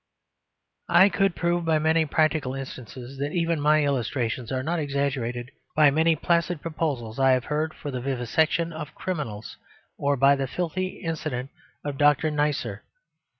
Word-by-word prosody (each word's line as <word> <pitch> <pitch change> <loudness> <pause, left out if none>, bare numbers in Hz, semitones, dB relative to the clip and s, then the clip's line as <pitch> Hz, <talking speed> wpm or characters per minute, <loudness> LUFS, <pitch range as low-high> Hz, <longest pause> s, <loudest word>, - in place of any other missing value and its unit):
I 175 +4 +7
could 195 -2 +1
prove 175 0 0
by 160 -1 +2
many 160 +1 +2
practical 155 -4 +1
instances 130 0 -8
that 145 +2 -2
even 165 -3 0
my 150 +1 +4
illustrations 125 -3 -1
are 130 -1 -1
not 170 +4 -1
exaggerated, 135 -4 -2 0.2
by 150 -2 +6
many 160 +3 +3
placid 170 +1 +1
proposals 140 -8 -3
I 135 -1 +5
have 130 -1 0
heard 155 +1 -2
for 145 - -6
the 125 -1 -4
vivisection 140 +6 0
of 150 -4 -7
criminals, 125 - -5 0.4
or 140 0 +1
by 140 +2 +5
the 135 -1 -2
filthy 180 +6 -3
incident 150 -6 -3 0.3
of 145 -2 -4
Dr. 150 +1 +4
Neisser. 150 -1 -1
145 Hz, 150 wpm, -25 LUFS, 130-160 Hz, 0.4 s, I